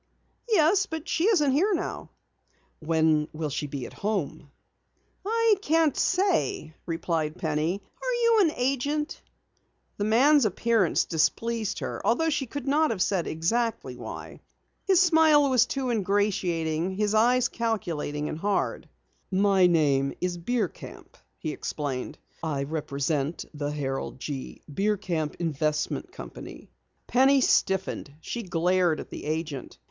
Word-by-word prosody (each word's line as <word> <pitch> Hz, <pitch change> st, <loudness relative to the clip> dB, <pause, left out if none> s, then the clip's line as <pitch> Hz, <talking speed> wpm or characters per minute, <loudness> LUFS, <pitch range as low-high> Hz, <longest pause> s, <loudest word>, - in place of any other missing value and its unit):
"Yes, 395 Hz, 0 st, +4 dB
but 320 Hz, 0 st, -6 dB
she 340 Hz, -, +1 dB
isn't 325 Hz, -11 st, +4 dB
here 370 Hz, +9 st, +2 dB
now." -, -, -4 dB, 0.7 s
"When 160 Hz, -1 st, +2 dB
will 155 Hz, -1 st, -3 dB
she 145 Hz, -, -3 dB
be 140 Hz, -2 st, -5 dB
home?" 195 Hz, -, -3 dB, 0.7 s
"I 450 Hz, +1 st, +3 dB
can't 320 Hz, -4 st, +2 dB
say," 370 Hz, -, 0 dB
replied 165 Hz, -1 st, -2 dB
Penny. 160 Hz, +4 st, -1 dB, 0.2 s
"Are -, -, -1 dB
you 460 Hz, -1 st, +5 dB
an 330 Hz, -5 st, +3 dB
agent?" 280 Hz, +4 st, -1 dB, 0.8 s
The 205 Hz, -, -1 dB
man's 265 Hz, +7 st, +5 dB
appearance 215 Hz, -2 st, +2 dB
displeased 220 Hz, +7 st, 0 dB
her -, -, -4 dB
although 320 Hz, +8 st, +2 dB
she 285 Hz, -3 st, -1 dB
could 285 Hz, +2 st, -6 dB
not 305 Hz, +3 st, +3 dB
have 195 Hz, -5 st, +1 dB
said 185 Hz, -4 st, 0 dB
exactly 225 Hz, +9 st, -1 dB
why. -, -, -8 dB, 0.5 s
His 380 Hz, -3 st, +5 dB
smile 320 Hz, -5 st, +5 dB
was 250 Hz, -1 st, +4 dB
too 265 Hz, -3 st, -2 dB
ingratiating, 185 Hz, -5 st, 0 dB
his 210 Hz, +1 st, 0 dB
eyes 245 Hz, +3 st, +4 dB
calculating 170 Hz, -10 st, -2 dB
and 155 Hz, -, -5 dB
hard. 205 Hz, +2 st, -1 dB, 0.4 s
"My 195 Hz, -1 st, +4 dB
name 140 Hz, -5 st, +2 dB
is 180 Hz, -1 st, -1 dB
Bierkamp," 210 Hz, +1 st, -4 dB, 0.2 s
he 155 Hz, -, -4 dB
explained. 140 Hz, -4 st, -4 dB, 0.2 s
"I 150 Hz, -4 st, -2 dB
represent 145 Hz, 0 st, -2 dB
the 145 Hz, -1 st, -3 dB
Harold 135 Hz, -3 st, -4 dB
G. 135 Hz, -1 st, -6 dB
Bierkamp 180 Hz, -2 st, -1 dB
Investment 155 Hz, -2 st, -2 dB
Company." -, -, -10 dB, 0.3 s
Penny 270 Hz, +2 st, +4 dB
stiffened. 190 Hz, -, +1 dB
She 235 Hz, +8 st, -5 dB
glared 180 Hz, -3 st, +1 dB
at -, -, -9 dB
the -, -, -7 dB
agent. 155 Hz, -3 st, -4 dB
195 Hz, 130 wpm, -27 LUFS, -, 0.8 s, you